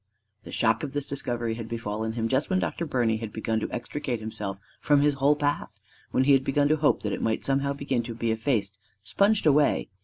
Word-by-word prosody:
The - - -9
shock 115 -1 +2
of 145 -2 -5
this 145 -1 -1
discovery 120 -4 -2
had 115 -1 -6
befallen 110 -1 -3
him 115 -1 -1
just 135 +5 0
when 185 - +2
Dr. 170 -2 -2
Birney 120 -5 +1
had 110 -1 -6
begun 110 0 -1
to - - -4
extricate 125 0 -3
himself 105 -3 -5 0.2
from 145 -1 +3
his 145 0 +3
whole 140 +2 +3
past; 145 0 -2 0.3
when 130 - +2
he 140 - +4
had 135 -1 +4
begun 145 +1 +2
to 155 - +4
hope 150 0 +2
that 105 -2 -1
it - - -3
might 110 -1 -1
somehow 140 +1 +1
begin 140 -3 -1
to 115 -1 -6
be 115 0 -1
effaced, 110 -4 -1 0.2
sponged 200 - +2
away. 150 -1 +3
125 Hz, 220 wpm, -26 LUFS, 110-145 Hz, 0.3 s, he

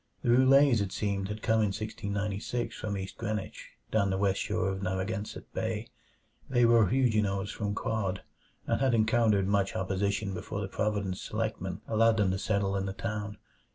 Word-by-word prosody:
The - - 0
Roulets, 130 -1 +6
it 100 -2 -2
seemed, 100 -2 -1
had 105 +1 -6
come 110 0 +3
in 110 - +3
1696 105 +2 -3
from 100 -2 -3
East 95 0 -7
Greenwich, 110 -3 -4 0.2
down 100 -3 +2
the 95 - 0
west 100 0 +1
shore 110 -1 0
of 95 0 -3
Narragansett 95 +3 -3
Bay. - - -3 0.6
They 120 -2 +4
were 115 -3 +5
Huguenots 105 -4 +1
from 100 -2 -3
Caude, 100 -4 -2 0.4
and - - 0
had 130 -3 +3
encountered 110 -3 +3
much 100 -1 +1
opposition 100 +1 -1
before 100 - -5
the 100 - -3
Providence 100 -2 -2
selectmen - - -3
allowed 115 0 +3
them 100 -3 +3
to 95 - -2
settle 100 -1 0
in 95 0 -1
the 95 - -3
town. 105 0 -4
105 Hz, 170 wpm, -30 LUFS, 95-110 Hz, 0.6 s, Roulets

